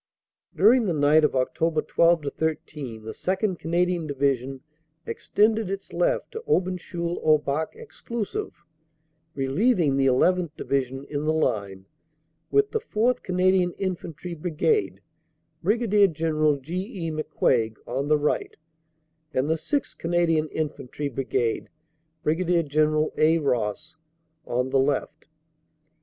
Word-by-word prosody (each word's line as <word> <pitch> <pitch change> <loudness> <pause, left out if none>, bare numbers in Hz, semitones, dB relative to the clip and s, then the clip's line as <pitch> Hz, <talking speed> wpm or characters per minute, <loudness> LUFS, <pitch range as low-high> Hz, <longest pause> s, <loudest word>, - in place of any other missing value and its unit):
"During 220 +6 +5
the 170 - 0
night 150 +2 +4
of 150 - +3
Oct. 130 -1 0 0.3
12 170 -2 +3
13 150 -7 -4
the 110 - -6
2nd. 190 - -1
Canadian 175 0 0
Divi 140 -1 +2
sion 130 +2 -8 0.4
extended 215 -1 +1
its 195 0 -6
left - - 0
to 450 - -5
Aubencheul 175 -2 -1
au 155 -1 +6
Bac 150 +2 -3
exclusive, 410 - -5 0.9
reliev 180 - +2
ing 140 -5 +2
the 135 0 +3
llth. 175 +7 +3
Division 135 -1 -2
in 145 0 -4
the 155 - +2
line, 100 -10 -1 0.6
with 420 0 +2
the 445 - 0
4th 250 - 0
Canadian 180 -1 +2
Infantry 180 -2 -5
Brigade 175 - 0 0.6
(Brig. 210 -3 +3
General 155 -2 +1
G. 145 +6 -7 0.3
E. 165 - -2
McCuaig) 130 -7 0
on 135 +4 -2
the 150 0 +4
right, 150 0 -1 0.8
and 130 +2 +1
the 160 - +2
6th. 280 - -3
Canadian 165 -2 +1
Infantry 150 -2 -4
Brigade 125 -3 -1 0.5
(Brig.General 155 -2 +1
A. 160 +2 +5
Ross) 145 +3 -2 0.5
on 125 +2 -1
the 135 - +3
left. 135 0 -1
160 Hz, 125 wpm, -25 LUFS, 140-185 Hz, 0.9 s, au